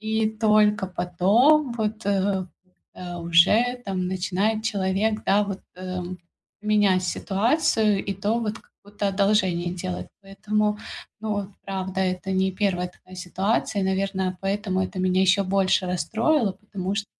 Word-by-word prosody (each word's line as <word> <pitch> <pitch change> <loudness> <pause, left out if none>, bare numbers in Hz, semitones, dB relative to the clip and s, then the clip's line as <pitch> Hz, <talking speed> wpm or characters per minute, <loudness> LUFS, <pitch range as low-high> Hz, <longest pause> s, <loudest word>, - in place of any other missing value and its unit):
И 220 0 0
только 210 -2 +4
потом 230 - +3
вот, 220 -1 -3
э, 195 -1 +1 0.5
э, 175 -1 -7
уже 200 +9 +4
там 185 -2 -2
начинает 195 +4 0
человек, 210 0 0
да, 205 +2 +4
вот, 195 -1 -5 0.2
эм, 185 0 -5 0.4
менять 205 -3 +3
ситуацию 210 - +1
и 195 - -1
то 205 +4 0
вот 220 0 -3
как - - -25
будто 205 0 -3
одолжение 190 -3 +1
делать. 90 - -5
Поэтому, 210 +2 -1 0.4
ну, 210 -2 -2 0.2
правда, 190 -1 -3
это 185 0 -1
не 190 0 +2
1 180 -2 -1 0.2
ситуация, 195 +3 -1
наверное, 190 -1 -1
поэтому 195 -1 -1
это 185 - -5
меня 185 0 +2
ещё 190 +1 +4
больше 190 0 +2
расстроило, 220 - +1
потому 195 -1 -5
что 205 -1 -2
195 Hz, 135 wpm, -24 LUFS, 185-215 Hz, 0.5 s, только